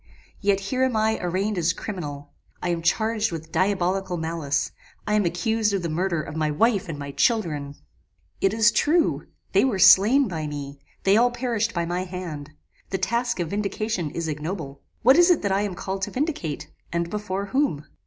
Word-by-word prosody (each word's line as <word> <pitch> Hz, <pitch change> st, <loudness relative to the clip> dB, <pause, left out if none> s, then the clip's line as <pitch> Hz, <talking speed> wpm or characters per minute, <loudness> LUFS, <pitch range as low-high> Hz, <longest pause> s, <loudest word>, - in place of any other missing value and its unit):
yet 200 Hz, -1 st, +2 dB
here 255 Hz, +7 st, -2 dB
am 260 Hz, -3 st, +1 dB
I 220 Hz, 0 st, +1 dB
arraigned 185 Hz, +3 st, -1 dB
as 170 Hz, 0 st, +2 dB
criminal. 145 Hz, -8 st, -6 dB, 0.3 s
I 180 Hz, -, -2 dB
am 170 Hz, -1 st, -1 dB
charged 220 Hz, +5 st, +1 dB
with 160 Hz, -1 st, -7 dB
diabolical 190 Hz, -1 st, 0 dB
malice; 160 Hz, -3 st, -1 dB, 0.3 s
I 210 Hz, -, -1 dB
am 210 Hz, -2 st, +3 dB
accused 210 Hz, +5 st, 0 dB
of 190 Hz, -, -2 dB
the 170 Hz, -, -2 dB
murder 170 Hz, -2 st, 0 dB
of 145 Hz, -, -8 dB
my 155 Hz, -1 st, 0 dB
wife 195 Hz, +4 st, +1 dB
and 155 Hz, -, -4 dB
my 140 Hz, -1 st, -6 dB
children! 145 Hz, -, 0 dB, 0.7 s
"It 195 Hz, -, +3 dB
is 220 Hz, +1 st, +4 dB
true, 325 Hz, +6 st, +2 dB, 0.2 s
they -, -, +4 dB
were 255 Hz, -7 st, +1 dB
slain 205 Hz, +8 st, +7 dB
by 160 Hz, -5 st, -4 dB
me; 140 Hz, -1 st, -6 dB, 0.2 s
they 195 Hz, +2 st, +5 dB
all 245 Hz, +2 st, +5 dB
perished 235 Hz, -3 st, -2 dB
by 170 Hz, -1 st, 0 dB
my 175 Hz, +2 st, -2 dB
hand. 175 Hz, -6 st, -6 dB, 0.4 s
The 190 Hz, -, -1 dB
task 235 Hz, +4 st, -1 dB
of 170 Hz, -2 st, -2 dB
vindication 205 Hz, -3 st, -2 dB
is 165 Hz, +2 st, -4 dB
ignoble. 150 Hz, -2 st, -5 dB, 0.2 s
What 260 Hz, +6 st, +7 dB
is 350 Hz, +1 st, +6 dB
it 350 Hz, -9 st, +3 dB
that 200 Hz, -, 0 dB
I 195 Hz, +1 st, +2 dB
am 205 Hz, -3 st, -2 dB
called 190 Hz, +2 st, -4 dB
to 195 Hz, -, -1 dB
vindicate? 250 Hz, -, -3 dB, 0.2 s
and 170 Hz, 0 st, -1 dB
before 200 Hz, -2 st, -3 dB
whom? 265 Hz, -, +1 dB
190 Hz, 190 wpm, -24 LUFS, 165-220 Hz, 0.7 s, slain